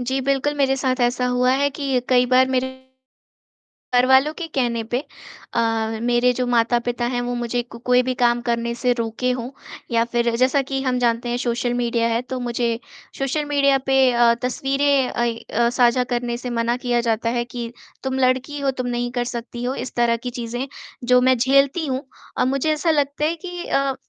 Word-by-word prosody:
जी, 260 +2 -1
बिल्कुल, 275 +2 0
मेरे 270 -1 +2
साथ 260 -1 -1
ऐसा 245 +1 +1
हुआ 250 0 +2
है 280 +1 +2
कि 275 -2 -1
कई 250 -1 +4
बार 255 +1 +4
मेरे 260 0 +1 1.3
घरवालों 265 +4 +4
के 340 - -4
कहने 240 -3 0
पे 240 +3 -2 0.5
अ, 225 -1 0
मेरे 245 +1 +3
जो 250 - +1
माता-पिता 240 0 +1
हैं 245 - 0
वो 245 0 -3
मुझे 240 0 -1
को 235 -1 -12
कोई 250 0 +6
भी 255 0 -1
काम 240 0 +3
करने 235 0 0
से 245 +1 +1
रोके 235 +1 -2
हों 250 0 -3 0.4
या 230 0 +3
फिर 235 0 +1
जैसा 260 +3 +3
कि 270 0 -3
हम 255 -2 0
जानते 240 0 0
हैं 240 - -1
सोशल 240 +1 0
मीडिया 235 -1 0
है 230 +1 0
तो 255 0 -5
मुझे 235 -1 -1 0.4
सोशल 275 +2 -1
मीडिया 280 -1 +3
पे 270 - +4
अ, 235 -1 +4
तस्वीरें 270 +1 +1
अइ 235 -1 -1
अ, 235 0 0
साझा 245 0 +3
करने 240 0 -2
से 250 +1 -6
मना 235 +1 +1
किया 245 -1 0
जाता 230 0 0
है 240 0 0
कि, 240 -1 -6 0.3
"तुम 265 0 -2
लड़की 260 +3 +1
हो 275 -1 +1
तुम 245 - -4
नहीं 240 0 -2
कर 245 -1 -1
सकती 240 0 -6
हो" 255 +2 -1
इस - - -9
तरह 235 -1 +2
की - - -1
चीज़ें 240 +3 -4 0.4
जो 250 +1 +4
मैं 260 0 +4
झेलती 275 +6 +3
हूँ 265 -1 -2 0.3
अ, - - +2
मुझे 275 +4 +1
ऐसा 320 +2 +1
लगता 290 0 0
है 325 +2 0
कि 355 -1 -6
अ, 275 -1 +1
250 Hz, 200 wpm, -21 LUFS, 240-265 Hz, 1.3 s, कोई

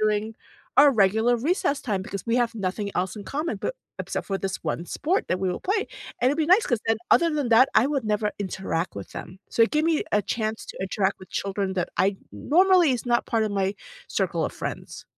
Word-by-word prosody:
during 215 +1 0 0.4
our 290 0 +8
regular 220 +3 +3
recess 285 +2 0
time 200 -5 -1
because 195 +2 -6
we 230 +1 +1
have 240 -1 +1
nothing 200 0 -3
else 185 +3 -1
in 205 - -7
common, 290 - -3
but - - -3 0.2
except - - -4
for 195 - -1
this 195 -1 -3
one 165 +2 -2
sport 360 - -1
that 185 - 0
we 190 - 0
all 180 - -4
play, 405 +3 0 0.3
and 250 - +4
it'd 290 - -1
be 315 - +3
nice 380 +6 +5
'cause 240 -3 0
then, 225 0 +3
other 340 -1 +5
than 290 -4 -1
that, 235 +3 +7
I 240 - +5
would 280 -4 -1
never 210 0 0
interact 190 -3 -3
with 100 - -8
them, 185 - -8
so 230 - +3
it 230 - +3
gave 305 +1 +2
me 325 -2 +2
a 210 - +4
chance 220 +2 -3
to - - -9
interact 190 0 0
with 185 - -13
children 195 -1 -2
that 180 -2 -1
I 195 +1 +2 0.2
normally 365 0 +4
is 245 - -3
not 240 -1 +2
part 225 -1 +1
of 215 - -2
my 195 0 0 0.3
circle - - 0
of - - -3
friends. - - -6
220 Hz, 230 wpm, -25 LUFS, 195-280 Hz, 0.4 s, our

